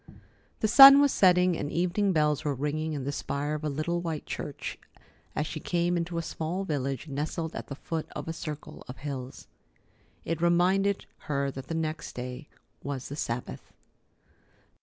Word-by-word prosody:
The 220 Hz, -, +3 dB
sun 275 Hz, +5 st, +11 dB
was 285 Hz, -1 st, +4 dB
setting, 180 Hz, -1 st, +4 dB
and 145 Hz, -, -4 dB
evening 180 Hz, +4 st, +1 dB
bells 150 Hz, -3 st, +2 dB
were 145 Hz, -2 st, -1 dB
ringing 155 Hz, +3 st, -2 dB
in 140 Hz, -3 st, -3 dB
the 140 Hz, -, -2 dB
spire 145 Hz, +1 st, -3 dB
of 155 Hz, 0 st, -4 dB
a 155 Hz, -, 0 dB
little 155 Hz, +4 st, -1 dB
white 165 Hz, -3 st, -4 dB
church, -, -, -5 dB, 0.6 s
as 150 Hz, -, 0 dB
she 155 Hz, -, -5 dB
came 175 Hz, +2 st, 0 dB
into 170 Hz, 0 st, -2 dB
a 165 Hz, -, -1 dB
small 165 Hz, +4 st, -3 dB
village 140 Hz, -5 st, -3 dB
nestled 155 Hz, +3 st, -3 dB
at -, -, -6 dB
the 140 Hz, -, -6 dB
foot 160 Hz, +2 st, -4 dB
of 150 Hz, 0 st, -5 dB
a 165 Hz, -, -2 dB
circle 155 Hz, -2 st, -7 dB
of 125 Hz, -, -8 dB
hills. 135 Hz, -2 st, -6 dB, 0.8 s
It 165 Hz, 0 st, -2 dB
reminded 185 Hz, +3 st, +2 dB, 0.2 s
her 140 Hz, -1 st, 0 dB
that 130 Hz, 0 st, -8 dB
the 165 Hz, -, -3 dB
next 160 Hz, -1 st, -3 dB
day 125 Hz, +4 st, -6 dB, 0.3 s
was 140 Hz, -2 st, -5 dB
the 140 Hz, -, -5 dB
Sabbath. 120 Hz, -4 st, -5 dB
155 Hz, 175 wpm, -28 LUFS, 140-175 Hz, 0.8 s, sun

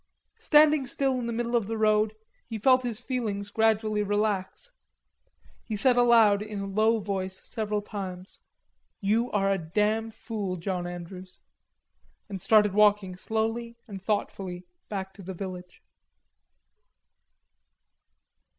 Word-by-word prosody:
Standing 300 Hz, -3 st, +5 dB
still 265 Hz, -1 st, 0 dB
in 235 Hz, -, -3 dB
the -, -, -2 dB
middle 235 Hz, +1 st, -1 dB
of 225 Hz, -4 st, +1 dB
the 225 Hz, 0 st, -3 dB
road, 215 Hz, 0 st, +2 dB, 0.3 s
he 225 Hz, -, -4 dB
felt 255 Hz, +4 st, +4 dB
his 240 Hz, -2 st, -3 dB
feelings 210 Hz, -6 st, -3 dB
gradually 220 Hz, -1 st, +2 dB
relax. 205 Hz, -, -1 dB, 0.9 s
He 220 Hz, -, -4 dB
said 250 Hz, +4 st, +4 dB
aloud 230 Hz, -4 st, +5 dB
in 210 Hz, -1 st, -5 dB
a 195 Hz, -, -3 dB
low 215 Hz, +3 st, +2 dB
voice 190 Hz, -2 st, -3 dB
several 210 Hz, -2 st, -3 dB
times: 190 Hz, -3 st, -7 dB, 0.6 s
"You 220 Hz, +5 st, +1 dB
are 195 Hz, -3 st, +1 dB
a 195 Hz, -, +1 dB
damn 210 Hz, +7 st, 0 dB
fool, 210 Hz, -4 st, -4 dB
John 180 Hz, 0 st, -3 dB
Andrews," 180 Hz, +1 st, -9 dB, 0.9 s
and 195 Hz, -3 st, -6 dB
started 210 Hz, 0 st, +4 dB
walking 205 Hz, -3 st, +3 dB
slowly 225 Hz, +4 st, -2 dB
and 195 Hz, -3 st, -8 dB
thoughtfully 190 Hz, -3 st, -3 dB, 0.2 s
back 190 Hz, -2 st, -4 dB
to 200 Hz, -, -13 dB
the 190 Hz, 0 st, -7 dB
village. 180 Hz, -1 st, -8 dB
210 Hz, 130 wpm, -27 LUFS, 195-225 Hz, 0.9 s, Standing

